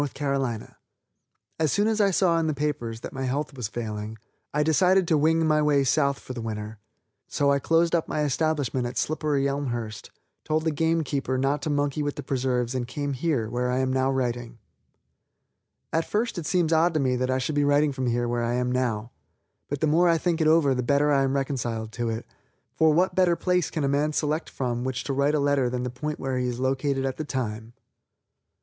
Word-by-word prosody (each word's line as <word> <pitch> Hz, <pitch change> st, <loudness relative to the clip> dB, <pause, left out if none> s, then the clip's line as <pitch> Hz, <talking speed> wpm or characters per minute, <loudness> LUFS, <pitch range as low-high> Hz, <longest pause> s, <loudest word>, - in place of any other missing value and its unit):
C. 145 Hz, 0 st, -3 dB, 1.3 s
As 155 Hz, -3 st, +2 dB
soon 205 Hz, +1 st, +2 dB
as 220 Hz, -1 st, +1 dB
I 200 Hz, -, +4 dB
saw 175 Hz, -3 st, +2 dB
in 160 Hz, -, 0 dB
the 155 Hz, -, -1 dB
papers 125 Hz, -6 st, -3 dB
that -, -, -7 dB
my 135 Hz, 0 st, -3 dB
health 135 Hz, +1 st, -2 dB
was 125 Hz, -5 st, -3 dB
failing, 110 Hz, -1 st, -5 dB, 0.3 s
I 150 Hz, +1 st, +1 dB
decided 180 Hz, +4 st, +3 dB
to 160 Hz, -, +3 dB
wing 160 Hz, +2 st, +3 dB
my 155 Hz, -1 st, +3 dB
way 145 Hz, -2 st, +3 dB
South 140 Hz, +1 st, +2 dB
for 130 Hz, -, -8 dB
the 120 Hz, -, -5 dB
winter. 110 Hz, -1 st, -5 dB, 0.5 s
So 140 Hz, 0 st, +1 dB
I 140 Hz, -, +3 dB
closed 165 Hz, +3 st, +2 dB
up 170 Hz, -2 st, +1 dB
my 150 Hz, -, -1 dB
establishment 145 Hz, -3 st, 0 dB
at 120 Hz, -, -7 dB
Slipperyelmhurst, 140 Hz, -7 st, -1 dB, 0.3 s
told 155 Hz, 0 st, 0 dB
the 160 Hz, -, +1 dB
game 160 Hz, +2 st, +1 dB
keeper 135 Hz, -3 st, -2 dB
not 135 Hz, +2 st, 0 dB
to 155 Hz, -, -3 dB
monkey 145 Hz, 0 st, 0 dB
with 145 Hz, -1 st, -2 dB
the -, -, -6 dB
preserves 125 Hz, -2 st, -1 dB
and 125 Hz, -2 st, -2 dB
came 145 Hz, +2 st, -3 dB
here, 130 Hz, -5 st, 0 dB
where 125 Hz, +2 st, -1 dB
I 125 Hz, -, 0 dB
am 130 Hz, 0 st, 0 dB
now 130 Hz, 0 st, +2 dB
writing. 120 Hz, -2 st, -2 dB, 1.4 s
At 165 Hz, 0 st, 0 dB
first 220 Hz, -2 st, -1 dB
it 160 Hz, -, -5 dB
seems 170 Hz, -3 st, +2 dB
odd 165 Hz, +1 st, +3 dB
to -, -, +3 dB
me 130 Hz, -2 st, +1 dB
that 130 Hz, +1 st, -1 dB
I 130 Hz, -, +2 dB
should 130 Hz, +4 st, -2 dB
be 145 Hz, 0 st, +2 dB
writing 145 Hz, +1 st, +3 dB
from 130 Hz, -3 st, -1 dB
where 120 Hz, 0 st, 0 dB
I 120 Hz, +1 st, 0 dB
now 125 Hz, -3 st, 0 dB
am, 115 Hz, -, -14 dB, 0.6 s
but 145 Hz, -1 st, -3 dB
the -, -, +3 dB
more 170 Hz, +3 st, +4 dB
I 165 Hz, -, +4 dB
think 170 Hz, 0 st, 0 dB
it 155 Hz, -, +3 dB
over 155 Hz, -4 st, +4 dB
the 125 Hz, -, -1 dB
better 140 Hz, +4 st, +2 dB
I 140 Hz, -1 st, +4 dB
am 135 Hz, 0 st, +1 dB
reconciled 120 Hz, -5 st, -2 dB
to 120 Hz, +1 st, -2 dB
it, 115 Hz, 0 st, -4 dB, 0.5 s
for 160 Hz, -1 st, +4 dB
what 180 Hz, +5 st, +2 dB
better 180 Hz, -2 st, +3 dB
place 180 Hz, -1 st, 0 dB
can 155 Hz, -, -3 dB
a -, -, +2 dB
man 145 Hz, +2 st, +1 dB
select 155 Hz, +2 st, -1 dB
from 120 Hz, -2 st, -2 dB
which 130 Hz, 0 st, -3 dB
to 140 Hz, -, -2 dB
write 140 Hz, +2 st, +2 dB
a -, -, +2 dB
letter 140 Hz, -3 st, +2 dB
than 125 Hz, 0 st, -3 dB
the 125 Hz, -, -3 dB
point 150 Hz, +5 st, -4 dB
where 130 Hz, -1 st, -2 dB
he 125 Hz, -, 0 dB
is 120 Hz, 0 st, -3 dB
located 135 Hz, +1 st, 0 dB
at 135 Hz, -1 st, -2 dB
the 155 Hz, -, -3 dB
time. 115 Hz, -5 st, -4 dB
140 Hz, 220 wpm, -26 LUFS, 125-155 Hz, 1.4 s, I